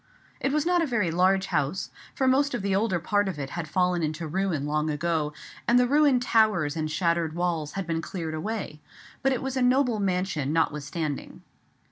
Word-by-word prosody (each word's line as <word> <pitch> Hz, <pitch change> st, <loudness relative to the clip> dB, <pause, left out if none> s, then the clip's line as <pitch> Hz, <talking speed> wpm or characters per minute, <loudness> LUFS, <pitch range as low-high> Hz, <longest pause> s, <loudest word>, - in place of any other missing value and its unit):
It 270 Hz, -, 0 dB
was 300 Hz, +1 st, +1 dB
not 350 Hz, 0 st, +3 dB
a 330 Hz, -, +1 dB
very 210 Hz, -10 st, 0 dB
large 190 Hz, +3 st, +3 dB
house, 170 Hz, +1 st, -1 dB, 0.2 s
for 265 Hz, -, +1 dB
most 275 Hz, +1 st, +3 dB
of 210 Hz, -, -4 dB
the 195 Hz, -1 st, +1 dB
older 200 Hz, -2 st, +1 dB
part 205 Hz, +4 st, +1 dB
of 185 Hz, -5 st, -3 dB
it 135 Hz, -2 st, -5 dB
had 170 Hz, -2 st, -4 dB
fallen 180 Hz, +2 st, +1 dB
into 155 Hz, +1 st, -2 dB
ruin 170 Hz, -3 st, -1 dB
long 150 Hz, +1 st, 0 dB
ago, 155 Hz, 0 st, -1 dB, 0.4 s
and 240 Hz, -, +5 dB
the 250 Hz, -, +5 dB
ruined 280 Hz, -2 st, +3 dB
towers 210 Hz, -11 st, +2 dB
and 155 Hz, -1 st, -2 dB
shattered 165 Hz, 0 st, 0 dB
walls 170 Hz, -4 st, -1 dB
had 195 Hz, -1 st, -3 dB
been 165 Hz, -1 st, -1 dB
cleared 165 Hz, -1 st, -5 dB
away; 175 Hz, -2 st, -4 dB, 0.4 s
but 270 Hz, -, +2 dB
it 260 Hz, -, -1 dB
was 265 Hz, 0 st, -3 dB
a 260 Hz, -, 0 dB
noble 250 Hz, -2 st, +3 dB
mansion 180 Hz, -7 st, -1 dB
notwithstanding. 155 Hz, -1 st, -2 dB
180 Hz, 195 wpm, -26 LUFS, 155-230 Hz, 0.4 s, and